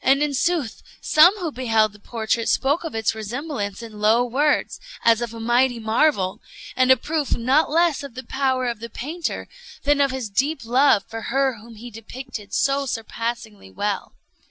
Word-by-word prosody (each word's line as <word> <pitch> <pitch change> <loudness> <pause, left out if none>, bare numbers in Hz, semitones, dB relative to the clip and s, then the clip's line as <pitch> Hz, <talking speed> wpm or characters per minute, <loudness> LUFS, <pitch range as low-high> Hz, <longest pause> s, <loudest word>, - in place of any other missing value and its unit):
And 275 +2 +4
in 295 -1 -1
sooth 290 -4 -1 0.2
some 350 +7 +5
who 345 -5 -3
beheld 225 -5 +1
the 210 - -16
portrait 225 +1 -2
spoke 285 +5 +1
of 325 -7 -6
its 225 0 0
resemblance 220 -1 -5
in 215 -2 -10
low 220 +3 +4
words, 285 +5 0 0.3
as 230 0 +5
of 235 -2 -3
a 230 - -9
mighty 240 +2 +2
marvel, 220 -3 +1 0.3
and 255 0 +3
a 260 - +7
proof 300 +2 -1
not 265 +7 +2
less 330 0 +2
of 280 -4 -9
the 255 - -6
power 260 -1 0
of 235 -3 -2
the 235 +1 -7
painter 315 +9 -4 0.4
than 285 0 +3
of 280 - +3
his 260 -3 -4
deep 270 +7 -1
love 250 -3 +4
for 225 0 -6
her 265 -2 +1
whom 230 +1 -13
he 235 +3 -10
depicted 225 -1 -9
so 275 0 +1
surpassingly 230 - -5
well. 200 - -3
245 Hz, 180 wpm, -22 LUFS, 225-280 Hz, 0.4 s, a